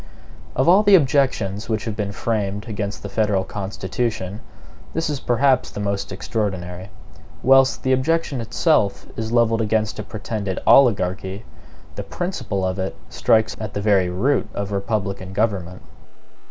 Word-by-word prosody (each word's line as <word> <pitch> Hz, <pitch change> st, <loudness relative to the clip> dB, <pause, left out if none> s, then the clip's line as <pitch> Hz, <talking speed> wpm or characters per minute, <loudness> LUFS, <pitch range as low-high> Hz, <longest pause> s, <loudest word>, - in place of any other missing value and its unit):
Of 130 Hz, -, +2 dB
all 185 Hz, +4 st, +7 dB
the 205 Hz, -2 st, +6 dB
objections 130 Hz, -, +1 dB
which 110 Hz, 0 st, -1 dB
have 110 Hz, -3 st, -3 dB
been 105 Hz, -2 st, -2 dB
framed 105 Hz, 0 st, -2 dB
against 100 Hz, -2 st, -4 dB
the -, -, -4 dB
federal 100 Hz, -2 st, +1 dB
Constitution, 100 Hz, +1 st, -3 dB, 0.6 s
this 165 Hz, -1 st, 0 dB
is 145 Hz, -, -2 dB
perhaps 130 Hz, +1 st, +2 dB
the -, -, -7 dB
most 100 Hz, -1 st, -2 dB
extraordinary. 95 Hz, -2 st, -3 dB, 0.5 s
Whilst 135 Hz, 0 st, +5 dB
the 130 Hz, -, +2 dB
objection 140 Hz, 0 st, 0 dB
itself 115 Hz, -, +1 dB
is 110 Hz, 0 st, -4 dB
levelled 115 Hz, -1 st, +3 dB
against 110 Hz, 0 st, 0 dB
a -, -, -3 dB
pretended 100 Hz, -2 st, -4 dB
oligarchy, 95 Hz, -5 st, +3 dB, 0.5 s
the -, -, -5 dB
principle 125 Hz, -, -3 dB
of 95 Hz, +1 st, -2 dB
it 95 Hz, 0 st, -3 dB, 0.2 s
strikes 110 Hz, 0 st, +2 dB
at 105 Hz, -2 st, -6 dB
the -, -, 0 dB
very 100 Hz, -3 st, +3 dB
root 105 Hz, +5 st, 0 dB
of 100 Hz, 0 st, -3 dB
republican 100 Hz, -2 st, -2 dB
government. 95 Hz, -4 st, -1 dB
105 Hz, 145 wpm, -22 LUFS, 100-120 Hz, 0.6 s, all